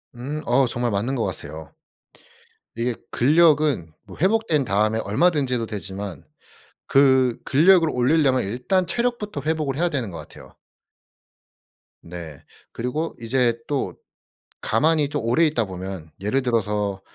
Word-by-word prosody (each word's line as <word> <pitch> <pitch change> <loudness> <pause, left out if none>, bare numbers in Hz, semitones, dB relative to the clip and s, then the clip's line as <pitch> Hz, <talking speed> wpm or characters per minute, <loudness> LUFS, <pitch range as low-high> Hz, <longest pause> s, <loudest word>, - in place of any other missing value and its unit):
음. 140 +6 -5
어 130 +3 +3
정말 120 0 -1
맞는 110 +7 -1
것 120 - -1
같아요. 80 0 -6 1.0
이게 120 +2 -1 0.2
근력은 150 - +3
뭐 - - -13
회복된 190 -5 +2
다음에 110 0 +1
얼마든지 135 - +1
해도 115 -2 -1
되지만 100 -5 -6 0.6
그 130 -3 +4
근력을 165 +4 +5
올리려면 130 0 +2
일단 125 - 0
체력부터 235 -7 -1
회복을 155 -4 -1
해야 175 +2 +1
되는 130 -9 -2
것 85 - -8
같아요. 75 - -13 1.5
네. 85 -4 -9 0.3
그리고 125 +8 -3
이제 120 0 +1
또 145 -2 -2 0.7
가만히 150 +5 +2
좀 145 -4 -3
오래 120 +9 +3
있다 145 -8 +1
보면 95 -3 -7
예를 105 +7 0
들어서 105 -5 -1
125 Hz, 275 characters per minute, -23 LUFS, 105-150 Hz, 1.5 s, 근력을